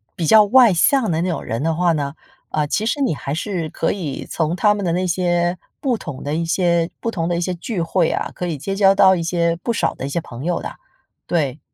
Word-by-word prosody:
比 170 - -2
较 215 +7 +7
外 235 0 +6
向 225 +5 +3
的 160 0 0
那 180 - -1
种 165 -5 -3
人 115 +2 -3
的 160 +1 0
话 175 +1 +2
呢， 145 -2 -2 0.3
呃， 155 -1 0
其 180 +8 -1
实 290 - -1
你 265 - +2
还 140 -1 -6
是 175 -2 -3
可 - - -1
以 160 -9 -5
从 160 +1 -1
他 210 +3 +3
们 205 -1 -4
的 175 - 0
那 180 +2 0
些 175 0 0 0.2
不 260 -4 0
同 145 - -7
的 145 - -3
一 165 +2 0
些 170 0 +1
不 230 - -2
同 165 -6 -2
的 175 - 0
一 - - -1
些 180 +1 -1
聚 175 +1 -3
会 165 0 +1
啊， - - -2
可 180 - -4
以 165 -3 -3
结 195 +8 -4
交 195 -1 +5
到 190 -1 +6
一 175 - -2
些 170 0 0
不 235 - -3
少 230 - 0
的 135 - -6
一 - - -5
些 155 - -1
朋 130 -3 -9
友 175 -1 -1
的， - - -7 0.5
对。 150 -5 -1
175 Hz, 275 characters per minute, -20 LUFS, 160-195 Hz, 0.5 s, 较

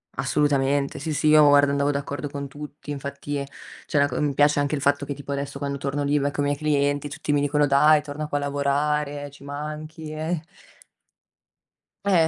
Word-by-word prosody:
Assolutamente, 140 -1 +1
sì, 155 +3 -3
sì, 150 - -1
io 150 -1 +7
guarda 145 0 +5
andavo 140 0 +1
d'accordo 145 0 -3
con 140 0 -5
tutti, 145 +1 -9
infatti, 140 0 -4 0.4
c'è - - -1
una 140 0 +5
co 125 -3 -3
mi 145 -2 0
piace 145 +1 +4
anche 145 +1 0
il 140 - -4
fatto 140 0 +1
che, 145 - -3
tipo 140 0 -8
adesso 140 0 -3
quando 140 0 -3
torno 140 +1 -2
lì 145 +1 +2
becco 145 +1 -1
i - - +1
miei 145 0 +1
clienti, 145 -1 0
tutti 150 0 -2
mi 145 - +2
dicono: 145 +1 +2
"Dai 150 +2 +5
torna 150 +1 -5
qua 145 - -1
a - - -2
lavorare, 145 0 -1
ci 140 0 -16
manchi", 155 +2 -6
eh. 155 +1 -3 1.6
Eh, 175 -5 +4
145 Hz, 195 wpm, -24 LUFS, 140-150 Hz, 1.6 s, io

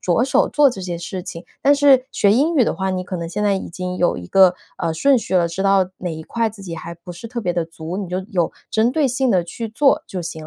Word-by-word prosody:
着 180 +6 +1
手 270 +1 +2
做 290 -2 +4
这 215 - -7
件 180 -2 -4
事 175 +2 -5
情。 175 -1 -8 0.2
但 285 +1 +5
是 280 -3 +5
学 200 - +3
英 290 +9 +2
语 275 - +5
的 - - +1
话， 190 0 -2
你 185 -1 -2
可 185 0 -5
能 170 -1 -5
现 195 +5 -3
在 205 -1 +2
已 190 - -4
经 180 +1 -5
有 175 - +1
一 90 0 -8
个， 190 -2 +5 0.2
呃， 165 -2 -2
顺 270 +10 +4
序 190 - -4
了， 170 -2 +3
知 190 +4 -4
道 195 -2 +3
哪 175 -3 -4
一 160 - -7
块 230 +5 -1
自 205 -2 -12
己 170 -3 -6
还 170 +1 -7
不 175 +1 -12
是 175 +7 -8
特 235 +1 -5
别 180 -5 -1
地 170 -1 -1
足， 165 +2 -7
你 200 -3 -4
就 180 +1 -2
有 175 -4 0 0.2
针 225 +3 +2
对 290 -1 +2
性 255 0 +1
地 180 -2 +3
去 225 +7 -6
做 275 +6 +2
就 180 -2 -5
行 160 -2 -7
190 Hz, 305 characters per minute, -20 LUFS, 175-235 Hz, 0.2 s, 但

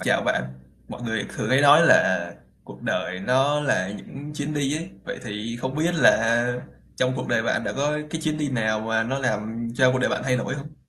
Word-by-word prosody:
Chào - - +1
bạn. 65 - 0 0.4
Mọi - - -8
người 110 -3 -2
thường - - -3
hay 130 +1 +4
nói 145 +4 +7
là - - +4 0.3
cuộc - - -13
đời 90 +1 -2
nó 135 +7 +2
là 95 -10 0
những 145 +6 -9
chuyến 150 +1 -4
đi 145 0 0
ấy. 165 +3 -7
Vậy - - -5
thì 110 +1 -5
không 130 +1 -3
biết 165 +4 0
là 120 -4 +4 0.4
trong 130 0 +1
cuộc - - -4
đời 115 - +2
bạn 115 - 0
đã - - -2
có 145 +2 0
cái 160 - -3
chuyến 155 -1 -1
đi 150 -1 -1
nào 110 -4 0
mà 110 0 0
nó 130 +4 -2
làm 115 -2 -2
cho 130 +1 +4
cuộc 130 - 0
đời 130 - +1
bạn - - -1
thay 125 -1 +2
đổi 125 - -3
hông? 150 +2 -9
130 Hz, 225 wpm, -24 LUFS, 115-145 Hz, 0.4 s, nói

